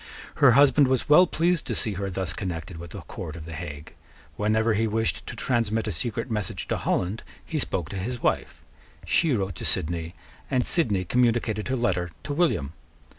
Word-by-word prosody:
Her 130 -4 +7
husband 140 +1 +6
was 130 -2 +1
well 180 +5 +7
pleased 170 0 +1
to - - -2
see 110 -4 -1
her 100 +1 -3
thus 95 -1 -2
connected 85 -2 -5
with 85 0 -8
the - - -8
court 80 - -7
of 80 -2 -8
the 80 - -8
Hague. 75 -3 -7 0.4
Whenever 110 +2 +2
he 110 +2 +1
wished 110 +1 -1
to - - -6
transmit 115 -2 0
a - - -2
secret 115 +8 -3
message 105 -4 -3
to - - +1
Holland, 95 +5 -1 0.2
he 155 - -2
spoke 85 - -2
to 100 - -4
his 120 +6 -3
wife: - - -1 0.4
she 165 -3 +3
wrote 95 -3 -1
to - - -6
Sidney; 85 +1 0 0.3
and 125 -1 +1
Sidney 105 - +2
communicated 115 -2 +1
her 130 - 0
letter 90 -7 0
to 145 - -3
William. 140 - +1
110 Hz, 190 wpm, -26 LUFS, 90-125 Hz, 0.4 s, Her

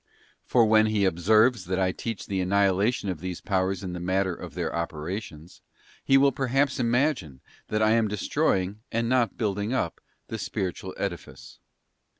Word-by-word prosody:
For 120 -2 +4
when 110 0 +5
he 105 -2 +1
observes, 110 +7 +3
that 90 +1 -2
I 95 -1 +2
teach 115 +2 -5
the 95 -1 -2
annihilation 100 +4 +1
of 90 -4 -3
these 90 +1 -5
powers 95 -1 -1
in 90 -2 -4
the 90 - -5
matter 95 +1 0
of - - -9
their - - -2
operations; 85 0 -5 0.4
he 135 - +5
will 140 0 +5
perhaps 135 +1 0
imagine, 120 - 0 0.3
that 110 0 0
I 110 - +4
am 115 -1 +3
destroying, 100 0 0
and 115 +1 0
not 125 -2 +1
building 105 +1 -1
up, 90 -10 -2 0.3
the 110 - -5
spiritual 95 -2 -4
edifice. 95 -4 -6
100 Hz, 160 wpm, -26 LUFS, 95-115 Hz, 0.4 s, when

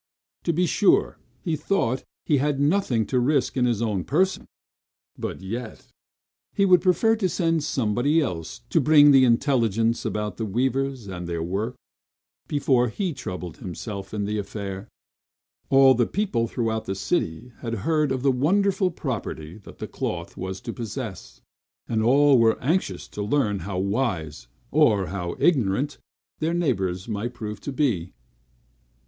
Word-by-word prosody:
To 170 - +2
be 175 +3 +1
sure, 195 +3 +2 0.2
he 165 -3 0
thought 130 -7 0 0.2
he 150 - +3
had 145 0 0
nothing 145 - +2
to 125 - 0
risk 130 0 +1
in 125 -2 +2
his 115 -2 0
own 105 -5 -1
person; 185 - 0 0.7
but - - -5
yet, - - -6 0.6
he 200 - +3
would 180 -3 +6
prefer 195 +5 +3
sending 165 -4 +1
somebody 130 +2 +1
else, 85 - -3
to 165 - +4
bring 145 0 +7
him 135 -1 +7
intelligence 115 -3 +2
about 105 -3 -3
the 110 - -2
weavers, 130 +3 -1
and 90 -3 -6
their 85 -1 -2
work, 100 +8 -2 0.7
before 130 -4 +2
he 185 - -2
troubled 90 - -6
himself 100 +2 -6
in 105 -1 -2
the 105 +1 -2
affair. 100 -1 -6 0.8
All 135 -1 +7
the 120 -1 +1
people 180 - 0
throughout 110 -2 -2
the 95 - -3
city 95 - -2
had 115 -1 -3
heard 155 -3 +2
of 130 -1 -2
the 140 - +4
wonderful 190 +8 +2
property 110 - -5
the 100 - -9
cloth 85 -1 -4
was 95 +1 -5
to - - -5
possess; 115 -4 -7 0.5
and 110 -2 0
all 135 +3 +5
were 115 -1 +3
anxious 135 - -1
to 105 - -6
learn 105 -2 +1
how 90 +2 -5
wise, 95 - -2 0.2
or 115 -11 +4
how 90 -3 -3
ignorant, 135 - +1 0.4
their 160 +2 0
neighbors 95 - -1
might 115 +2 -3
prove 105 -2 -6
to 140 - -5
be. 120 - 0
120 Hz, 150 wpm, -24 LUFS, 100-145 Hz, 0.8 s, bring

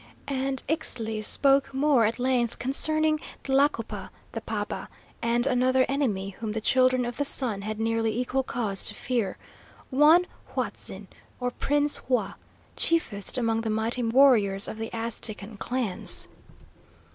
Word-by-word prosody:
And 270 -1 -1
Ixtli 225 -8 -2
spoke 275 +3 +3
more 270 -4 +4
at 225 +2 0
length 245 -2 0
concerning 310 +4 +2 0.2
Tlacopa, 270 -4 0 0.2
the - - -5
paba, - - -4 0.3
and 235 +1 +2
another 255 0 +3
enemy 225 -9 -1
whom 215 +2 -5
the 220 - -1
Children 255 +2 +3
of 240 -1 -5
the 285 - +1
Sun 245 -7 0
had 215 +1 -4
nearly 225 0 0
equal 255 +2 0
cause 220 -6 -1
to - - -1
fear, 235 -7 -2 0.5
one 305 +6 +6 0.3
Huatzin, - - -4 0.3
or 250 0 -1
Prince 290 +3 +1
Hua, 250 -1 -1 0.4
chiefest 235 - 0
among 225 -2 +1
the 225 - -3
mighty 220 +3 0
warriors 225 -5 +4
of 220 - -6
the 225 0 -4
Aztecan 220 -2 -5
clans. 240 -4 -2
245 Hz, 135 wpm, -26 LUFS, 225-270 Hz, 0.5 s, one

